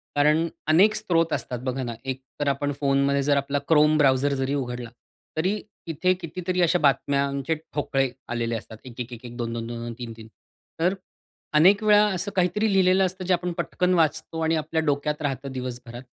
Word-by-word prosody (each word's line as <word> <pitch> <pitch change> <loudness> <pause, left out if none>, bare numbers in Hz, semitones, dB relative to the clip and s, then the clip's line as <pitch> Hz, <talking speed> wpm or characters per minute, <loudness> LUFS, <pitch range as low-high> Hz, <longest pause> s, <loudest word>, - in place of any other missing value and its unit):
कारण 150 +3 +3 0.2
अनेक 190 +7 +5
स्त्रोत 165 -4 +1
असतात 125 -2 -3
बघा 130 +1 -1
ना, 120 -1 -4
एक 130 0 -4 0.2
तर 145 - -1
आपण 140 +1 0
फोनमध्ये 140 0 +2
जर 145 0 +3
आपला 140 +1 -1
Chrome 150 0 +5
Browser 135 0 +3
जरी 135 +1 -1
उघडला, 125 -3 -4 0.5
तरी 190 +6 0 0.3
तिथे 170 +3 +1
कितीतरी 180 +2 -2
अशा 175 +1 +3
बातम्यांचे 140 +1 +1
ठोकळे 140 -3 -2 0.2
आलेले 120 -1 -2
असतात, 110 0 -8
एक-एक-एक-एक, 120 0 -8
दोन-दोन-दोन-दोन, 115 0 -4
तीन-तीन, 115 -2 -8 0.5
तर 175 +3 +2 0.7
अनेक 200 +6 +5
वेळा 210 0 +6
असं 200 +3 -3
काहीतरी 200 +4 +1
लिहिलेलं 190 0 +4
असतं 185 0 -4
जे 185 - +2
आपण 180 0 -1
पटकन 180 0 0
वाचतो 165 -1 0
आणि 160 +1 +2
आपल्या 160 +1 -1
डोक्यात 145 +1 -1
राहतं 140 -2 -3
दिवसभरात 125 -1 -6
145 Hz, 160 wpm, -25 LUFS, 130-170 Hz, 0.7 s, वेळा